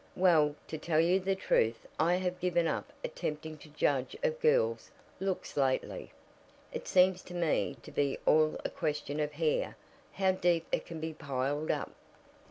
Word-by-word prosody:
"Well, 160 Hz, -5 st, +4 dB
to 155 Hz, -, -5 dB
tell 155 Hz, 0 st, +1 dB
you 175 Hz, +3 st, +4 dB
the 195 Hz, +1 st, 0 dB
truth 115 Hz, -11 st, +1 dB
I 170 Hz, +3 st, +4 dB
have 180 Hz, 0 st, -2 dB
given 175 Hz, -2 st, +1 dB
up -, -, -2 dB
attempting 160 Hz, -, -4 dB
to 155 Hz, -, -14 dB
judge 140 Hz, -3 st, 0 dB
of 485 Hz, -1 st, 0 dB
girls' 470 Hz, 0 st, +2 dB, 0.3 s
looks 190 Hz, -1 st, -3 dB
lately. 135 Hz, -2 st, 0 dB, 0.6 s
It -, -, -5 dB
seems 185 Hz, 0 st, +4 dB
to 180 Hz, -, -10 dB
me 170 Hz, -3 st, 0 dB
to -, -, -10 dB
be 140 Hz, -1 st, 0 dB
all 155 Hz, 0 st, +4 dB
a -, -, 0 dB
question 150 Hz, -2 st, -2 dB
of 150 Hz, 0 st, -1 dB
hair 155 Hz, 0 st, 0 dB, 0.4 s
how 190 Hz, -1 st, +2 dB
deep 175 Hz, -3 st, +1 dB
it -, -, -1 dB
can 165 Hz, -1 st, -6 dB
be 160 Hz, 0 st, -4 dB
piled 140 Hz, +1 st, -2 dB
up." -, -, -1 dB
165 Hz, 170 wpm, -31 LUFS, 150-185 Hz, 0.6 s, Well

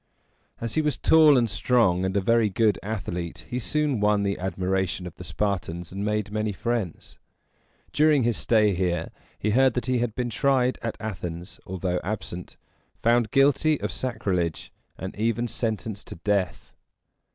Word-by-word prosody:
As 115 Hz, -1 st, -3 dB
he 155 Hz, -, +2 dB
was 150 Hz, -1 st, 0 dB
tall 155 Hz, -3 st, +6 dB
and 120 Hz, -2 st, +3 dB
strong, 100 Hz, -5 st, +2 dB
and 95 Hz, +1 st, 0 dB
a -, -, +2 dB
very 115 Hz, +2 st, +3 dB
good 105 Hz, +1 st, +2 dB
athlete, 90 Hz, -6 st, -4 dB
he 125 Hz, -, -3 dB
soon 150 Hz, -1 st, 0 dB
won 105 Hz, 0 st, +2 dB
the 100 Hz, 0 st, -1 dB
admiration 95 Hz, 0 st, -1 dB
of 90 Hz, -, -8 dB
the -, -, -8 dB
Spartans, 85 Hz, -1 st, -2 dB
and 100 Hz, +2 st, -4 dB
made 105 Hz, -1 st, -1 dB
many 110 Hz, 0 st, -1 dB
friends. 110 Hz, -3 st, -3 dB, 0.7 s
During 150 Hz, -3 st, +4 dB
his 120 Hz, -1 st, +1 dB
stay 105 Hz, -2 st, +3 dB
here, 90 Hz, -2 st, -1 dB, 0.3 s
he 105 Hz, -, -1 dB
heard 130 Hz, +2 st, +4 dB
that 125 Hz, -, -1 dB
he 130 Hz, -1 st, +1 dB
had 115 Hz, -2 st, -1 dB
been 120 Hz, -1 st, -2 dB
tried 130 Hz, +1 st, +2 dB
at 115 Hz, -, -4 dB
Athens, 90 Hz, -4 st, -6 dB
although 90 Hz, -1 st, -2 dB
absent, 90 Hz, -3 st, -5 dB, 0.5 s
found 115 Hz, -1 st, +3 dB
guilty 145 Hz, +2 st, +3 dB
of -, -, -3 dB
sacrilege, 90 Hz, -10 st, -2 dB, 0.3 s
and 95 Hz, -, -6 dB
even 115 Hz, +2 st, 0 dB
sentenced 110 Hz, -3 st, -3 dB
to -, -, -8 dB
death. 95 Hz, +2 st, -1 dB
105 Hz, 165 wpm, -25 LUFS, 95-120 Hz, 0.7 s, tall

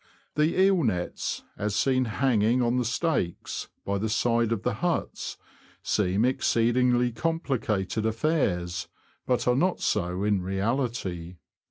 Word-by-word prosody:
The 155 Hz, +4 st, +1 dB
eel 190 Hz, -2 st, +5 dB
nets, 90 Hz, -7 st, -2 dB, 0.2 s
as 105 Hz, 0 st, -1 dB
seen 130 Hz, +5 st, +2 dB
hanging 115 Hz, 0 st, +2 dB
on 120 Hz, +1 st, +1 dB
the 125 Hz, -, +1 dB
stakes, 120 Hz, -, -1 dB, 0.2 s
by 100 Hz, 0 st, -1 dB
the 110 Hz, +2 st, -1 dB
side 115 Hz, 0 st, +1 dB
of 110 Hz, -2 st, -1 dB
the 125 Hz, -, 0 dB
huts, 170 Hz, +9 st, -2 dB, 0.5 s
seem 100 Hz, +2 st, +1 dB
exceedingly 125 Hz, 0 st, +2 dB
complicated 115 Hz, -, -1 dB
affairs, 105 Hz, -, 0 dB, 0.4 s
but 125 Hz, -1 st, +1 dB
are 125 Hz, -, +4 dB
not 175 Hz, +7 st, +1 dB
so 90 Hz, +2 st, 0 dB
in 105 Hz, -2 st, +2 dB
reality. 95 Hz, -3 st, -2 dB
115 Hz, 130 wpm, -27 LUFS, 100-130 Hz, 0.5 s, eel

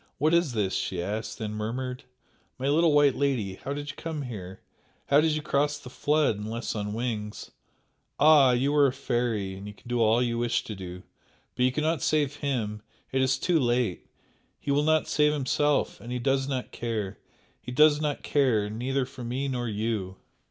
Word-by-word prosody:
"What 155 Hz, +3 st, +2 dB
is 170 Hz, -6 st, +3 dB
this?" 100 Hz, -4 st, 0 dB
she 90 Hz, -, -2 dB
asked 105 Hz, +4 st, -3 dB
then 110 Hz, -2 st, -4 dB
murmured 125 Hz, +4 st, -4 dB, 0.5 s
"My 130 Hz, +1 st, -2 dB
little 160 Hz, +3 st, +4 dB
white 145 Hz, -2 st, +5 dB
lady, 120 Hz, -10 st, -1 dB
how 135 Hz, -, -4 dB
did 145 Hz, 0 st, -4 dB
you -, -, -18 dB
come 160 Hz, -3 st, -4 dB
here? 95 Hz, -7 st, -7 dB, 0.5 s
How 140 Hz, +1 st, +6 dB
could 160 Hz, -, +2 dB
you 155 Hz, -1 st, -1 dB
cross 145 Hz, 0 st, +1 dB
the 125 Hz, -3 st, -11 dB
flood? 145 Hz, -7 st, +1 dB
unless 115 Hz, +3 st, -4 dB
on 105 Hz, -1 st, -3 dB
wings? 110 Hz, -3 st, -4 dB, 0.7 s
Ah! 150 Hz, -3 st, +7 dB
you 130 Hz, +4 st, +2 dB
are 145 Hz, -1 st, +5 dB
a 130 Hz, -, -1 dB
fairy 120 Hz, -7 st, -1 dB
and 95 Hz, +2 st, -8 dB
you 105 Hz, -, -9 dB
can -, -, -18 dB
do 120 Hz, -1 st, 0 dB
all 115 Hz, +2 st, +4 dB
you 120 Hz, -1 st, -1 dB
wish 120 Hz, 0 st, 0 dB
to 110 Hz, -, -6 dB
do 90 Hz, -2 st, -8 dB, 0.5 s
but 125 Hz, -, +2 dB
you 130 Hz, -, +3 dB
cannot 155 Hz, +3 st, 0 dB
save 150 Hz, -2 st, +1 dB
HIM! 115 Hz, -8 st, -2 dB, 0.3 s
it 130 Hz, -, +1 dB
is 130 Hz, 0 st, +2 dB
too 175 Hz, -3 st, +2 dB
late! 120 Hz, -7 st, 0 dB, 0.5 s
He 140 Hz, -, -3 dB
will 140 Hz, +1 st, +3 dB
not 155 Hz, +1 st, +2 dB
save 150 Hz, -1 st, +3 dB
himself 145 Hz, +1 st, +1 dB
and 120 Hz, -, -8 dB
he 125 Hz, -, -1 dB
does 135 Hz, +2 st, +1 dB
not 130 Hz, -3 st, -3 dB
care, 110 Hz, -5 st, -4 dB, 0.4 s
he -, -, -7 dB
does 150 Hz, +3 st, +5 dB
not 150 Hz, -2 st, -2 dB
care 115 Hz, -8 st, +2 dB
neither 130 Hz, +4 st, -1 dB
for 130 Hz, -1 st, -10 dB
me 130 Hz, +4 st, -2 dB
nor 125 Hz, -3 st, -2 dB
you!" 105 Hz, -3 st, -2 dB
125 Hz, 195 wpm, -27 LUFS, 110-145 Hz, 0.7 s, Ah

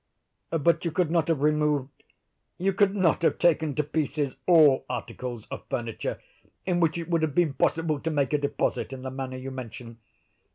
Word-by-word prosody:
"But 165 Hz, +1 st, +2 dB
you 170 Hz, -, 0 dB
could 160 Hz, 0 st, 0 dB
not 165 Hz, -2 st, +2 dB
have 160 Hz, -4 st, 0 dB
removed—you 150 Hz, +5 st, -2 dB
could 200 Hz, +1 st, +3 dB
not 180 Hz, -6 st, +2 dB
have 165 Hz, -, +2 dB
taken 160 Hz, -4 st, +2 dB
to 150 Hz, -, +1 dB
pieces 145 Hz, -2 st, -2 dB
all 155 Hz, -6 st, +6 dB
articles 120 Hz, -1 st, -5 dB
of -, -, -6 dB
furniture 115 Hz, -2 st, -3 dB, 0.5 s
in 180 Hz, -2 st, +1 dB
which 165 Hz, -1 st, +2 dB
it 170 Hz, -, -5 dB
would 170 Hz, -2 st, +1 dB
have 155 Hz, -3 st, -1 dB
been 170 Hz, -5 st, +3 dB
possible 160 Hz, 0 st, 0 dB
to 165 Hz, -, -2 dB
make 145 Hz, -2 st, 0 dB
a 150 Hz, -, +3 dB
deposit 140 Hz, -1 st, -1 dB
in 130 Hz, -1 st, -8 dB
the 130 Hz, -, -4 dB
manner 130 Hz, -1 st, -5 dB
you 130 Hz, +1 st, -6 dB
mention. 115 Hz, -2 st, -8 dB
150 Hz, 180 wpm, -27 LUFS, 130-165 Hz, 0.5 s, all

